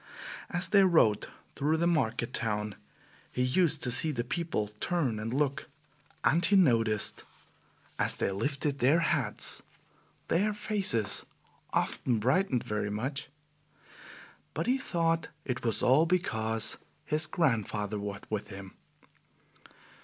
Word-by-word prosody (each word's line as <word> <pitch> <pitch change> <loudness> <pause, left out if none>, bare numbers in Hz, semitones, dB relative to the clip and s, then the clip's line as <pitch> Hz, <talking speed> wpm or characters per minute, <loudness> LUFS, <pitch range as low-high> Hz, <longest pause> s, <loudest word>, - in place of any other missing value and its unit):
As 175 0 -1
they 200 -2 +6
rode 160 - +3 0.3
through 150 +3 +1
the 170 - +1
market 125 -9 0
town, 105 -2 -2 0.6
he 125 - 0
used 155 +4 +2
to 125 - -1
see 155 +6 +3
the 120 -5 -2
people 125 -6 -2
turn 140 -11 0
and 110 +2 -4
look, 140 +3 -1 0.5
and 170 +3 +3
he 200 +4 +4
noticed 115 - +3 0.8
that - - +3
as - - +3
they - - -1
lifted 140 +7 -2
their 145 +7 +4
hats 145 -10 +1 0.7
their 205 +4 +1
faces 195 - +1 0.5
often 120 -3 0
brightened 130 - +1
very 105 -1 -2
much; 135 +8 -3 1.3
but - - -1
he 255 +2 +2
thought 165 -6 0 0.2
it 125 -1 -3
was 115 -3 0
all 145 +6 +5
because 110 -11 0 0.3
his 155 +1 -1
grandfather 110 - 0
was 100 -1 -5
with 105 -1 -3
him. 100 -2 -10
130 Hz, 130 wpm, -30 LUFS, 110-165 Hz, 1.3 s, they